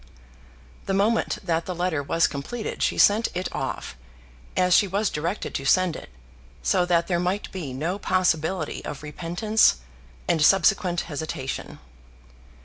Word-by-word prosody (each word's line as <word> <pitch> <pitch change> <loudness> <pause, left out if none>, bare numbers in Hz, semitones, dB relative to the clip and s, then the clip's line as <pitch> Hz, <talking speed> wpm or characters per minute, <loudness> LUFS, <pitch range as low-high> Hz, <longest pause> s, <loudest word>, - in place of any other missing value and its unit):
The 195 - 0
moment 215 +4 +1
that 170 -3 -1
the 180 - -3
letter 175 -4 -1
was 165 +4 +2
completed 185 +12 -4
she - - +1
sent 215 +3 +5
it 180 +1 -1
off, - - -4 0.6
as 180 -1 +3
she 200 - +5
was 200 +2 0
directed 170 +7 -3
to 135 - -3
send 180 +4 +3
it, - - -9 0.5
so 180 -2 +2
that 170 -1 +2
there 175 -1 0
might 180 +4 -2
be 170 -8 -5
no 165 +9 -3
possibility 185 -2 0
of 145 - -7
repentance 175 - +2 0.5
and 160 - +2
subsequent 185 0 +3
hesitation. 145 -4 -5
180 Hz, 140 wpm, -25 LUFS, 160-195 Hz, 0.6 s, sent